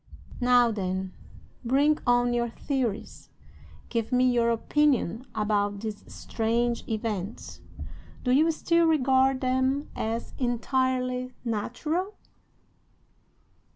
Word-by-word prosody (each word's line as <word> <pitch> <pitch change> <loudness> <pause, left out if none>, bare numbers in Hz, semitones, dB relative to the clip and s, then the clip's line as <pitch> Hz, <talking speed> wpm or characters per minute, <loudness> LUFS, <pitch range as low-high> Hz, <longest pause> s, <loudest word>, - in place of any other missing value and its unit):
"Now, 245 -1 +4
then, 190 -2 -3 0.5
bring 280 +5 +3
on 245 0 +3
your 235 0 0
theories! 240 -3 -3 0.6
Give 230 0 -2
me 255 0 +4
your 235 -1 +2
opinion 255 - +1
about 205 -1 0
these 215 -2 -5
strange 235 +1 -1
events. 215 -2 -4 0.6
Do 250 - +1
you 305 +6 +4
still 335 +1 +2
regard 265 -3 +3
them 260 +2 0
as 225 +1 -3
entirely 255 0 0
natural?" 300 - -2
245 Hz, 95 wpm, -27 LUFS, 225-265 Hz, 0.6 s, Now